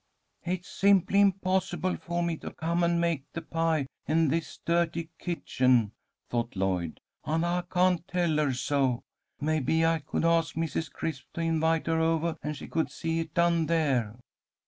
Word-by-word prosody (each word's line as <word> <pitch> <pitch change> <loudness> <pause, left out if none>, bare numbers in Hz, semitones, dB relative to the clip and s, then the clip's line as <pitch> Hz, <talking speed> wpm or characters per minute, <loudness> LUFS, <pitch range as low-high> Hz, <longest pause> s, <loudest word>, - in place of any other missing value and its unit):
"It's 180 0 -3
simply 200 0 +3
impossible 185 -2 +1
for 175 0 -3
me 170 -1 0
to - - -7
come 170 +2 -1
and 170 0 +2
make 165 -5 -1
the 165 - -5
pie 165 -3 0 0.2
in 160 -1 +3
this 165 +3 -2
dirty 170 -1 0
kitchen," 130 - +1 0.4
thought 120 -1 -2
Lloyd, 95 -4 -1 0.2
"and 160 +3 0
I 175 +1 +1
can't 180 -1 +2
tell 175 -4 +1
her 150 -3 +2
so. 130 -1 0 0.4
Maybe 155 +1 +1
I 165 0 +2
could 155 +2 -2
ask 165 -2 +2
Mrs. 160 0 -2
Crisp 150 -5 -4
to 170 - -2
invite 165 0 +1
her 165 0 +1
ovah 165 0 +1
and 150 -1 -4
she - - -8
could 160 -1 -1
see 165 0 -2
it 165 -1 -5
done 170 -2 +3
there." 135 -10 +1
165 Hz, 165 wpm, -28 LUFS, 150-170 Hz, 0.4 s, simply